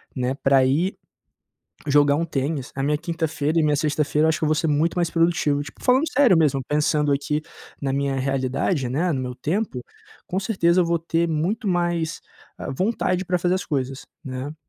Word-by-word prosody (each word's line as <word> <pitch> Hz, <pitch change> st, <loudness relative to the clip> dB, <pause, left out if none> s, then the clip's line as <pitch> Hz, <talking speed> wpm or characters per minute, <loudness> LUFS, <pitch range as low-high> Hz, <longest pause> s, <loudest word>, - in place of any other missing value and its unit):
né, 125 Hz, 0 st, -1 dB
pra 135 Hz, -1 st, +3 dB
ir 165 Hz, +9 st, +1 dB, 0.9 s
jogar 145 Hz, 0 st, +4 dB
um 165 Hz, -, 0 dB
tênis, 140 Hz, -3 st, -3 dB
a 135 Hz, -, -3 dB
minha 150 Hz, +1 st, +1 dB
quinta-feira 160 Hz, -1 st, -1 dB
e 160 Hz, -, +3 dB
minha 150 Hz, -1 st, +2 dB
sexta-feira, 150 Hz, 0 st, +1 dB
eu -, -, +3 dB
acho 160 Hz, -, +1 dB
que -, -, -1 dB
eu -, -, +2 dB
vou 155 Hz, -, +3 dB
ser 160 Hz, +1 st, 0 dB
muito 150 Hz, +3 st, +1 dB
mais 170 Hz, -1 st, +1 dB
produtivo. 165 Hz, -4 st, +1 dB
Tipo, 145 Hz, -, -12 dB
falando 260 Hz, +4 st, +4 dB
sério 255 Hz, -9 st, +5 dB
mesmo, 140 Hz, -4 st, +2 dB
pensando 150 Hz, -1 st, +1 dB
aqui 150 Hz, +2 st, -1 dB, 0.4 s
na 135 Hz, -1 st, -1 dB
minha 140 Hz, 0 st, 0 dB
realidade, 135 Hz, +2 st, -1 dB
né, 160 Hz, +7 st, 0 dB
no 130 Hz, -, -1 dB
meu 125 Hz, -1 st, -4 dB
tempo, 170 Hz, -, -2 dB, 0.5 s
com 190 Hz, +2 st, -2 dB
certeza 185 Hz, -4 st, +2 dB
eu 175 Hz, -, +3 dB
vou 170 Hz, 0 st, +1 dB
ter 165 Hz, +1 st, 0 dB
muito 175 Hz, +8 st, -1 dB
mais, 175 Hz, -3 st, -1 dB, 0.4 s
ah, -, -, -5 dB
vontade 185 Hz, -, 0 dB
pra 180 Hz, 0 st, 0 dB
fazer 175 Hz, +1 st, +1 dB
as -, -, -4 dB
coisas, 135 Hz, -2 st, -3 dB, 0.2 s
né. 135 Hz, +3 st, -5 dB
155 Hz, 195 wpm, -23 LUFS, 140-170 Hz, 0.9 s, sério